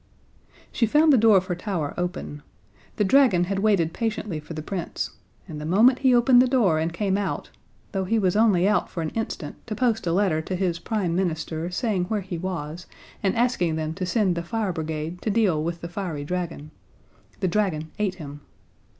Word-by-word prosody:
She 230 - +1
found 300 +5 +5
the - - +6
door 220 -2 +6
of 185 - +1
her 185 - -2
tower 175 -5 -3
open. 175 -4 -4 0.5
The 210 - +1
dragon 205 -4 +4
had 195 +2 -1
waited 195 -6 +2
patiently 215 -7 -3
for 150 +2 -9
the 155 - -5
Prince, 180 0 -4 0.4
and 150 -1 -7
the - - -5
moment 225 +10 +4
he 260 -2 +4
opened 245 +1 +6
the 255 - +3
door 220 -11 +3
and 165 +1 -1
came 195 +3 0
out 200 - -3 0.4
though 195 -2 -1
he 225 +5 +1
was 190 -4 +1
only 205 -4 +4
out 210 - +1
for 165 - -4
an 155 - -3
instant 225 0 -4
to 215 - -3
post 225 -4 0
a - - +2
letter 175 -3 +2
to 185 +4 -4
his 175 -2 -1
Prime 180 -2 -1
Minister 165 -2 -2
saying 190 -1 -1
where 210 +2 -1
he 180 -3 -5
was 170 -2 -5 0.3
and 195 - +1
asking 230 -9 +1
them 160 0 -2
to 185 +1 -4
send 195 -2 +2
the 170 - -2
fire 200 +2 -2
brigade 160 +1 -4
to - - -2
deal 200 -8 +2
with 170 +1 -4
the 170 - -5
fiery 170 -5 -4
dragon 170 -3 -4 0.7
the 190 - 0
dragon 170 -5 -1
ate 200 -3 0
him. 145 -4 -9
185 Hz, 200 wpm, -24 LUFS, 165-215 Hz, 0.7 s, the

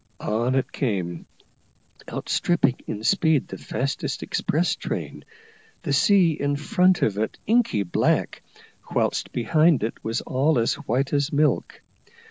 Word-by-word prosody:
On 120 +4 0
it 135 - 0
came, 90 - -3 0.8
outstripping 155 -8 0
in 105 0 -5
speed 160 - +2
the - - -7
fastest 140 +2 -3
express - - 0
train, - - -5 0.6
the 140 - -1
sea 180 +4 +4
in 145 -2 -1
front 180 +4 +2
of 105 -1 +1
it 110 - -2
inky 215 - +2
black, 85 - 0 0.5
whilst - - 0
behind 155 +4 +3
it 110 - -4
was 115 +2 -2
all 135 +3 +1
as 115 0 +2
white 130 +5 -2
as 140 -1 +1
milk. 150 +1 0
140 Hz, 130 wpm, -24 LUFS, 115-160 Hz, 0.8 s, sea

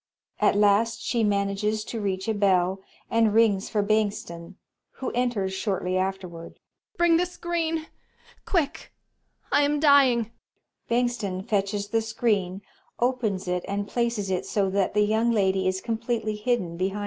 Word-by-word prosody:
At - - +3
last 210 +3 +3
she 235 -2 0
manages 205 +1 0
to 225 0 -5
reach 190 0 -2
a 220 - +1
bell 190 -2 +2 0.3
and 225 -2 +3
rings 210 -4 +3
for 210 -2 0
Bengtsson, 200 -5 -2 0.4
who 260 - -4
enters 235 -6 -1
shortly 190 -2 -2
afterward. 185 -3 -3
Young - - -53
Ladt. - - -35
Bring 345 -1 +4
the 355 - +2
screen! 335 -2 -2 0.6
Quick! 330 -7 -2 0.6
I - - +4
am 290 +1 +1
dying! 265 -6 +4 0.6
Bengtsson 235 -6 -1
fetches 205 0 -1
the 225 +1 +1
screen, 205 -4 -1 0.4
opens 235 -7 0
it 180 0 -1
and 200 +1 -2
places 235 -5 -1
it 185 - -2
so 195 -2 0
that 195 0 0
the 210 0 +4
Young 220 +3 +2
Ladt 195 -4 +2
is 190 0 0
completely 230 -1 -2
hidden 210 -6 -1
behind 190 +2 -1
U. - - -3
210 Hz, 155 wpm, -25 LUFS, 195-235 Hz, 0.6 s, Bring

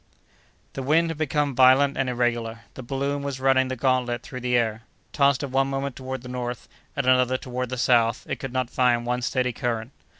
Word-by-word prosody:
The 135 - -5
wind 160 +5 +2
had 160 - -7
become 145 -2 0
violent 130 +2 +5
and 130 -1 0
irregular; 120 -2 -1
the - - -8
balloon 140 +3 -2
was 140 -2 -4
running 130 0 +3
the 130 - -3
gantlet 125 -1 0
through 125 - -7
the 125 0 +1
air. 110 -2 0 0.3
Tossed 140 -1 +3
at 140 - -4
one 135 +1 +2
moment 135 -1 -3
toward 130 -1 -6
the - - -9
north, 125 -1 -5 0.3
at 140 - 0
another 130 0 +3
toward 125 -1 -4
the 130 - -4
south, 120 -2 +2
it - - -3
could 135 - -5
not 130 -1 -2
find 120 -2 +2
one 125 +1 -1
steady 125 0 0
current. 115 0 -3
130 Hz, 205 wpm, -24 LUFS, 120-135 Hz, 0.3 s, violent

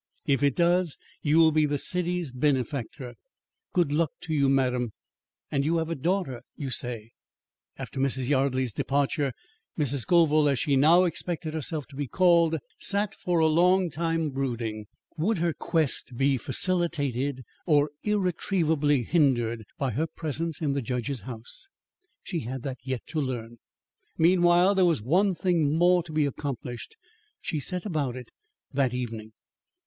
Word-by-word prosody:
If 140 -2 +1
it 140 -2 +2
does, 175 -1 +2 0.2
you 150 +1 +2
will 160 -1 +6
be 155 -1 +3
the 145 0 -1
city's 180 -1 -1
benefactor. 130 -1 -2 0.6
Good 170 -5 +1
luck 155 +1 +2
to 160 - -4
you, 140 -3 +3
madam. 125 -4 +1 0.6
And 140 -1 +1
you 160 +4 +1
have 165 0 -2
a - - -1
daughter, 165 -5 -1
you 135 -3 -5
say?" 115 -2 -1 0.7
After - - -6
Mrs. 130 -2 +1
Yardley's 130 -3 +1
departure, 140 +2 0 0.5
Mrs. 140 -3 +1
Scoville, 155 +1 +4
as 140 - +1
she 140 +3 +1
now 160 +7 +6
expected 170 -2 -2
herself 155 -1 -3
to 135 - -15
be 145 0 -3
called, 170 0 +3 0.2
sat 200 0 0
for 180 -4 -1
a 160 - +4
long 175 +3 +3
time 165 0 -1
brooding. 115 -5 -3 0.3
Would 195 +7 +1
her 170 0 0
quest 150 -7 -1
be 135 +1 +3
facilitated 140 - -1 0.2
or 145 -2 +3
irretrievably 165 - +1
hindered 120 -8 +1
by 135 -4 -1
her 150 +9 -1
presence 160 +1 -3
in 145 -2 +1
the 140 - -1
judge's 125 0 -3
house? 120 - -9 0.5
She 175 -4 -3
had 130 +1 -5
that 130 -3 -5
yet 130 -2 -4
to 155 - -2
learn. 120 -3 -5 0.6
Meanwhile, 175 +2 +4
there 190 -2 +3
was 165 -11 +2
one 185 - +2
thing 165 -5 +1
more 175 +1 +4
to 165 -1 -10
be 155 -1 +2
accomplished. 135 - -5 0.4
She 155 - -3
set 180 +7 -1
about 150 - -1
it 125 -2 -9 0.4
that 130 -3 +1
evening. 110 -3 -5
145 Hz, 155 wpm, -27 LUFS, 130-170 Hz, 0.7 s, will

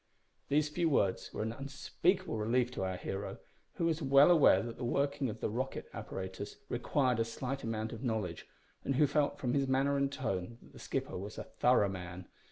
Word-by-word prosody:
These 150 +1 +2
few 165 +2 +1
words 100 -10 +1
were - - -3
an 110 +1 -2
unspeakable 145 - -1
relief 120 +3 +1
to 125 - -4
our 95 -1 -2
hero, 95 +2 -4 0.4
who 170 - 0
was 165 -1 +1
well 140 +3 +6
aware 160 -9 +6
that 115 0 -6
the - - -6
working 140 +2 0
of 105 - -7
the - - 0
rocket 130 +4 -3
apparatus 95 +1 -6
required 125 0 +1
a - - +4
slight 130 +4 -4
amount 110 0 -2
of 115 - -7
knowledge, 110 -9 -2 0.4
and 135 - 0
who 150 - +5
felt 145 0 +1
from 125 -2 -1
his 140 -1 +2
manner 135 +2 +2
and 140 0 +1
tone 110 -4 -3
that - - -18
the - - -12
skipper - - -3
was 100 +3 -7
a - - -4
thorough 125 -5 +3
man. 90 -1 -6
125 Hz, 200 wpm, -33 LUFS, 110-140 Hz, 0.4 s, well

